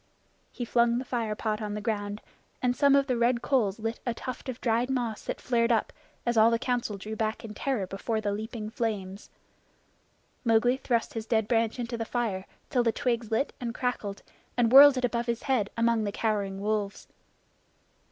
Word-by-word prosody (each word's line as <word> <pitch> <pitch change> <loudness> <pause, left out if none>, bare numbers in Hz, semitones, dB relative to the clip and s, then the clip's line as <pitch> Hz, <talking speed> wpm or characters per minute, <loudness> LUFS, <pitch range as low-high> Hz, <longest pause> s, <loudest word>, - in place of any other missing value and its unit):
He 245 - -5
flung 235 0 +3
the 255 - -3
fire 230 -4 -2
pot 215 0 -2
on 210 -1 -3
the - - -3
ground, 205 -1 -3 0.4
and 250 -1 +1
some 280 0 +5
of 280 -1 +4
the 255 -2 0
red 235 +1 +2
coals 220 -8 +1
lit 225 +1 -3
a 240 -2 -2
tuft 255 +2 -6
of 255 -1 -5
dried 235 +1 +1
moss 240 -5 -2
that - - -4
flared 235 -1 +1
up, 225 - +1 0.3
as 240 -1 +1
all 220 +1 +7
the 230 - +2
Council 240 -4 -2
drew 215 +3 -6
back 220 +1 -2
in 215 - -7
terror 245 -3 -1
before 195 +4 -2
the 205 -1 -1
leaping 215 +1 -5
flames. 205 -4 -3 1.1
Mowgli 240 +2 +3
thrust 240 -3 -1
his 225 -1 -5
dead 220 -3 +1
branch 225 0 +1
into 235 -1 -4
the - - 0
fire 215 -6 -2 0.2
till 255 -4 +3
the 235 -1 +2
twigs 235 -3 -1
lit 225 +6 0
and 240 -1 -3
crackled, 215 -5 -3 0.3
and 235 -2 +3
whirled 275 +1 +9
it 255 - +2
above 235 0 -1
his 235 0 -2
head 240 -7 +1
among 230 -1 +2
the 205 - -1
cowering 200 -3 -1
wolves. 205 -1 -2
230 Hz, 195 wpm, -28 LUFS, 215-245 Hz, 1.1 s, whirled